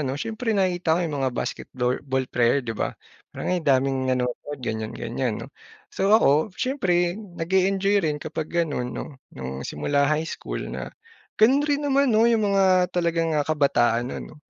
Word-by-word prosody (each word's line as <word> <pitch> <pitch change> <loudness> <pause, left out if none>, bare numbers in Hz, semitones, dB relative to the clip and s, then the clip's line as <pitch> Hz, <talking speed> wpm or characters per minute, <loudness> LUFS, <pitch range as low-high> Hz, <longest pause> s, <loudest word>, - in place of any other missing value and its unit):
'no, 135 -1 -2
siyempre 220 +5 -2
nakita 175 -4 +1
ko - - 0
yung 150 -3 -3
mga 130 -1 +1
basketbor 125 0 -2
ball 130 -1 -1
player 120 +2 +2
di 115 - -3
ba, 110 - -2 0.5
"ay 180 -1 -1
daming 135 -2 +1
nanonood," 130 +3 -2
ganyan 110 -1 -3
ganyan - - -2
'no. - - -11 0.4
So 195 - 0
ako 160 0 +2
siyempre 185 -8 0
nag-e-enjoy 190 +2 +1
rin 155 -4 -1
kapag 155 +1 -5
ganun 150 -8 -2
'no, 135 -3 -7 0.2
nung 65 0 -5
simula 140 - 0
high 155 +1 +1
school - - -5
na - - -5 0.5
ganun 255 +6 +5
rin 290 0 +1
naman 280 0 +3
'no, 225 -1 +4
yung 225 -3 +3
mga 185 -2 +4
talagang 170 -3 0
kabataan 120 -6 +2
nun - - -5
'no, - - -15
160 Hz, 165 wpm, -24 LUFS, 130-195 Hz, 0.5 s, ganun